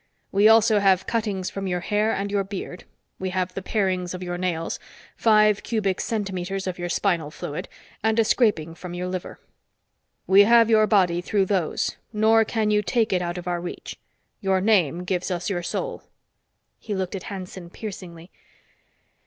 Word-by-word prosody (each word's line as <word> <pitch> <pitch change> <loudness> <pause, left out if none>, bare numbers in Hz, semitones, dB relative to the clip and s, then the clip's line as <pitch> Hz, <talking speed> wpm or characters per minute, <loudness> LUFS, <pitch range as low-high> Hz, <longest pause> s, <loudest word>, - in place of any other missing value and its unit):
We 200 +2 +5
also 220 -1 +5
have 190 -2 +3
cuttings 210 -5 -2
from 195 -1 -4
your 180 -1 -1
hair 210 +3 +1
and 200 -1 -2
your 200 -1 +1
beard; 190 -2 -7 0.3
we 190 - -2
have 185 -1 -2
the 195 - -4
parings 185 -3 -1
of 185 - -6
your 175 0 -3
nails, 175 -2 -2 0.4
five 215 -2 +4
cubic 200 -5 -1
centimeters 195 -3 -3
of 180 -1 -4
your 175 0 -3
spinal 170 -6 0
fluid 150 0 -6 0.3
and 220 0 +2
a 225 - +4
scraping 205 -10 +2
from 175 +1 -8
your 180 +1 -3
liver. 180 -1 -5 0.9
We 195 +1 +7
have 230 0 +5
your 215 -1 +5
body 180 -5 +3
through 195 +1 +1
those, 190 -5 -1
nor 220 +1 +4
can 215 -1 0
you 210 0 +3
take 220 0 0
it 180 - +1
out 175 0 -3
of 180 0 -7
our 175 -1 -1
reach. 175 - -7 0.4
Your 190 -2 +1
name 180 -5 +2
gives 180 0 -2
us 180 +2 -2
your 175 -2 -1
soul." 485 - -4 0.8
He 210 -3 -4
looked 190 0 -3
at 195 - -4
Hanson 185 -3 -7
piercingly. 180 -4 -9
190 Hz, 175 wpm, -24 LUFS, 180-210 Hz, 0.9 s, We